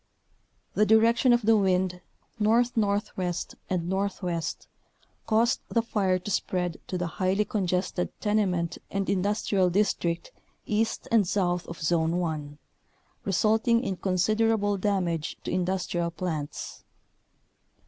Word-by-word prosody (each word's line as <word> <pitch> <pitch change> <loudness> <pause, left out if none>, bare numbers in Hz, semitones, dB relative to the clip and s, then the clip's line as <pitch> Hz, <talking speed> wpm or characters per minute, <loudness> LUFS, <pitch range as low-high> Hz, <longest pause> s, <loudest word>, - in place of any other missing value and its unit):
The 210 - +3
direction 230 +3 +5
of 240 -1 +3
the 225 +1 +5
wind, 185 -3 +1 0.4
north 230 +3 +3
northwest 200 -4 -1 0.2
and 175 -2 -1
northwest, 185 -3 -2 0.6
caused 230 +3 +3
the 230 - +1
fire 195 -5 +1
to 185 +3 -6
spread 180 -3 -1
to 185 - -2
the 180 - -1
highly 190 +5 0
congested 185 -5 -1
tenement 195 -6 0
and 195 -1 -2
industrial 195 -1 +1
district 175 - 0 0.3
east 220 +1 -1
and 220 -5 +4
south 180 -2 0
of 170 - -8
Zone 165 +1 +1
1, 155 -4 -3 0.7
re 195 - -1
sulting 225 +5 +3
in 195 -6 -2
considerable 205 +3 +1
damage 185 -5 -1
to - - -4
industrial 180 -1 -1
plants. 165 -4 -5
190 Hz, 120 wpm, -27 LUFS, 175-215 Hz, 0.7 s, direction